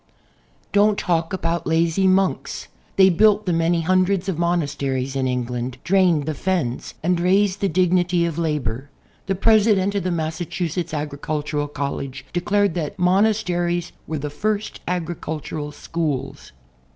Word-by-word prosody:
• - - -38
Don't 205 0 +4
talk 165 -2 0
about 170 -2 -2
"lazy 165 +3 +2
monks." 190 0 0 0.3
They 190 -1 +7
built 210 +4 +4
the 180 - +1
many 165 +1 +2
hundreds 185 +2 +2
of 180 -4 -2
monasteries 140 -6 -1
in 130 -1 0
England, 125 0 -3
drained 180 -6 +3
the 155 - -2
fens 150 -6 -2
and 175 +1 +2
raised 190 +2 +2
the 200 - +2
dignity 175 0 +2
of 170 -1 -3
labor. 145 -5 -2 0.4
The 195 - 0
President 205 -1 +3
of 200 - 0
the 185 - -1
Massa 160 0 -2
chusetts 170 0 -3
Agricultural 150 0 -3
College 140 -2 -4
declared 200 +1 +1
that 165 +3 -3
monasteries 180 -2 +1 0.2
were 160 - -2
the 145 0 -4
first 210 +6 -2
agricultural 160 -3 -4
schools. 145 -3 -4
170 Hz, 140 wpm, -22 LUFS, 150-185 Hz, 0.4 s, They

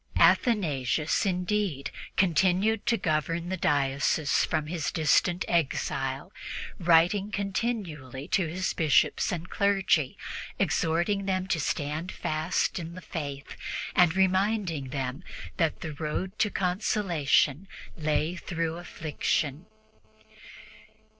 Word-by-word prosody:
Athanasius, 155 - +3
indeed, 180 -6 -1 0.3
continued 190 +4 +2
to 230 - +3
govern 165 +1 -1
the 190 - -1
diocese 140 -1 +1
from 155 - -1
his 160 -1 -2
distant 170 +3 +2
exile, 135 -1 -1 0.5
writing 175 +4 +4
continually 190 - -3
to 185 -2 +1
his 185 +3 -2
Bishops 160 +6 +2
and 175 -1 -4
clergy, 195 -8 +2 0.4
exhorting 175 +5 +1
them 185 -1 0
to 175 -4 0
stand 150 +4 -2
fast 155 +4 -1
in 170 0 -7
the 185 - -8
Faith 145 -5 -6 0.4
and 175 -1 +5
reminding 190 -6 +1
them 135 +4 -3 0.3
that 165 -4 0
the 155 - -4
road 165 +7 -4
to 210 - +3
consolation 180 -5 +1 0.3
lay 155 +2 0
through 165 -2 -3
affliction. 155 -2 -2
170 Hz, 105 wpm, -28 LUFS, 150-190 Hz, 0.5 s, and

